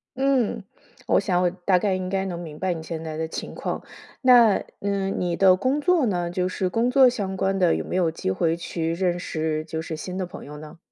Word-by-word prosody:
嗯， 265 Hz, -5 st, +1 dB, 0.5 s
我 -, -, +4 dB
想 185 Hz, -3 st, +1 dB
我 180 Hz, -, +3 dB
大 180 Hz, +1 st, +1 dB
概 195 Hz, 0 st, +1 dB
应 185 Hz, 0 st, -3 dB
该 195 Hz, 0 st, -1 dB
能 180 Hz, -3 st, -4 dB
明 160 Hz, -3 st, -8 dB
白 185 Hz, -1 st, 0 dB
你 160 Hz, -1 st, -7 dB
现 160 Hz, 0 st, -5 dB
在 160 Hz, -1 st, -5 dB
的 160 Hz, -, -2 dB
情 -, -, -6 dB
况。 -, -, -3 dB, 0.4 s
那 240 Hz, -5 st, +6 dB, 0.2 s
嗯， 200 Hz, -1 st, -1 dB
你 175 Hz, -1 st, -1 dB
的 190 Hz, -1 st, +6 dB
工 260 Hz, +10 st, 0 dB
作 340 Hz, -1 st, +3 dB
呢？ 175 Hz, -5 st, -1 dB
就 180 Hz, +1 st, -1 dB
是 185 Hz, 0 st, -1 dB
工 230 Hz, +6 st, +1 dB
作 265 Hz, 0 st, +7 dB
相 195 Hz, -5 st, -3 dB
关 195 Hz, 0 st, 0 dB
的， 180 Hz, -3 st, +3 dB
有 -, -, -3 dB
没 -, -, -4 dB
有 175 Hz, -3 st, +2 dB
机 160 Hz, -, -4 dB
会 165 Hz, -, 0 dB
去 165 Hz, -1 st, -3 dB
认 175 Hz, 0 st, 0 dB
识 155 Hz, -3 st, -2 dB
就 160 Hz, 0 st, -5 dB
是 160 Hz, -1 st, -5 dB
新 180 Hz, +4 st, -6 dB
的 190 Hz, -, -2 dB
朋 175 Hz, -, -10 dB
友 150 Hz, +1 st, -9 dB
呢？ 150 Hz, +3 st, -11 dB
185 Hz, 255 characters per minute, -24 LUFS, 165-195 Hz, 0.5 s, 作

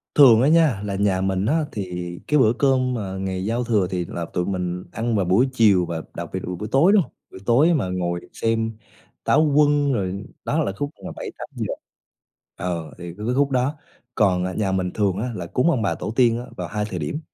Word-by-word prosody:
Thường 120 Hz, -6 st, +8 dB
á 135 Hz, -, +4 dB
nha, 155 Hz, -10 st, +4 dB
là 100 Hz, -1 st, -2 dB
nhà 95 Hz, -1 st, +1 dB
mình 95 Hz, 0 st, 0 dB
á, 155 Hz, +6 st, +1 dB
thì 90 Hz, -3 st, -4 dB, 0.2 s
cái 150 Hz, -, +3 dB
bữa 110 Hz, -3 st, +5 dB
cơm 130 Hz, -1 st, +2 dB
mà 100 Hz, -5 st, -4 dB
ngày 95 Hz, -1 st, -3 dB
giao 115 Hz, +3 st, 0 dB
thừa 105 Hz, -6 st, +1 dB
thì 90 Hz, -2 st, -1 dB
là 85 Hz, 0 st, -5 dB
tụi 90 Hz, -, 0 dB
mình 90 Hz, -1 st, -3 dB
ăn 115 Hz, 0 st, -1 dB
vào 100 Hz, -3 st, +1 dB
buổi 100 Hz, +9 st, +3 dB
chiều 105 Hz, -7 st, +4 dB
và 85 Hz, -1 st, -4 dB
đặc -, -, -6 dB
biệt -, -, -1 dB
vào 90 Hz, -, -4 dB
buổi 105 Hz, +4 st, -6 dB
tối, 155 Hz, +8 st, +5 dB
đúng 210 Hz, -, +6 dB
hông? -, -, -7 dB, 0.2 s
Buổi -, -, -10 dB
tối 140 Hz, -, +4 dB
mà 125 Hz, -, 0 dB
ngồi 85 Hz, -1 st, -2 dB
xem 115 Hz, -1 st, -1 dB, 0.5 s
Táo 150 Hz, -, +4 dB
Quân 145 Hz, -1 st, +4 dB
rồi 100 Hz, -2 st, -2 dB, 0.2 s
đó 155 Hz, +2 st, +1 dB
là -, -, -1 dB
khúc 145 Hz, 0 st, -3 dB, 0.2 s
mà -, -, -5 dB
7:00-8:00, -, -, -5 dB, 0.8 s
ờ, 85 Hz, -4 st, -4 dB
thì 85 Hz, -, -10 dB
cái 105 Hz, -, -6 dB
cái 125 Hz, +2 st, 0 dB
khúc 140 Hz, 0 st, +2 dB
đó. 130 Hz, +3 st, +1 dB, 0.4 s
Còn, 90 Hz, -3 st, +2 dB
à, 95 Hz, -, -3 dB
nhà 100 Hz, -1 st, -1 dB
mình 95 Hz, -1 st, -1 dB
thường 100 Hz, -3 st, 0 dB
á, 115 Hz, +5 st, -2 dB
là 90 Hz, -, -5 dB
cúng 125 Hz, -, +1 dB
ông 130 Hz, -8 st, 0 dB
bà 100 Hz, -, 0 dB
tổ -, -, -4 dB
tiên 120 Hz, -2 st, +4 dB
á 120 Hz, -, -7 dB
vào -, -, -4 dB
2 105 Hz, 0 st, -2 dB
thời 95 Hz, -4 st, -5 dB
điểm, 80 Hz, -, -3 dB
105 Hz, 230 wpm, -23 LUFS, 95-130 Hz, 0.8 s, Thường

